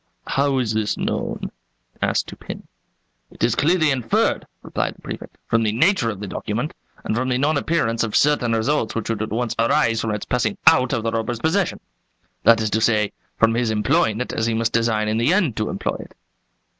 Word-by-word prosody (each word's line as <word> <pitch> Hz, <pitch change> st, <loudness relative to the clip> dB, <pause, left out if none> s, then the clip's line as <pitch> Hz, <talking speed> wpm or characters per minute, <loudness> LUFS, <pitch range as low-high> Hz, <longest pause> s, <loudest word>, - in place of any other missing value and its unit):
"How 140 Hz, 0 st, +1 dB
is 120 Hz, -4 st, 0 dB
this 110 Hz, -1 st, 0 dB
known?" -, -, -3 dB, 0.5 s
asked -, -, +1 dB
Dupin. -, -, -9 dB, 0.6 s
"It -, -, -8 dB
is 115 Hz, -1 st, +3 dB
clearly 155 Hz, +3 st, +3 dB
inferred," 125 Hz, -4 st, 0 dB, 0.2 s
replied -, -, -2 dB
the -, -, -21 dB
Prefect, -, -, -8 dB
"from 115 Hz, -, +2 dB
the 110 Hz, -2 st, +1 dB
nature 155 Hz, -, +3 dB
of 100 Hz, -4 st, -5 dB
the 105 Hz, -, -5 dB
document 115 Hz, -, -3 dB, 0.3 s
and -, -, -1 dB
from 130 Hz, +2 st, 0 dB
the 125 Hz, -, +1 dB
non 145 Hz, +4 st, +2 dB
appearance 140 Hz, -7 st, 0 dB
of 110 Hz, -2 st, -3 dB
certain 140 Hz, -5 st, +3 dB
results 115 Hz, +2 st, 0 dB
which 115 Hz, 0 st, -2 dB
would 110 Hz, -, -2 dB
at 110 Hz, -, -2 dB
once 115 Hz, +1 st, -1 dB
arise 115 Hz, 0 st, +2 dB
from 115 Hz, -, -2 dB
its 105 Hz, -1 st, -3 dB
passing 115 Hz, -4 st, 0 dB
out 130 Hz, -1 st, +6 dB
of 115 Hz, -, -1 dB
the 115 Hz, -, 0 dB
robber's 115 Hz, +1 st, -2 dB
possession, 165 Hz, +6 st, 0 dB, 0.6 s
that 115 Hz, -1 st, +5 dB
is 110 Hz, -1 st, -1 dB
to 110 Hz, -, +1 dB
say, 110 Hz, -2 st, +2 dB, 0.3 s
from 115 Hz, 0 st, +4 dB
his 115 Hz, 0 st, 0 dB
employing 110 Hz, 0 st, +1 dB
it 125 Hz, -, -4 dB
as 110 Hz, -, 0 dB
he 115 Hz, -, 0 dB
must 115 Hz, +1 st, 0 dB
design 115 Hz, -2 st, +1 dB
in 110 Hz, +1 st, 0 dB
the 120 Hz, +7 st, +3 dB
end 180 Hz, -, +2 dB
to 110 Hz, -, -1 dB
employ -, -, -2 dB
it." -, -, -11 dB
115 Hz, 205 wpm, -22 LUFS, 110-130 Hz, 0.6 s, out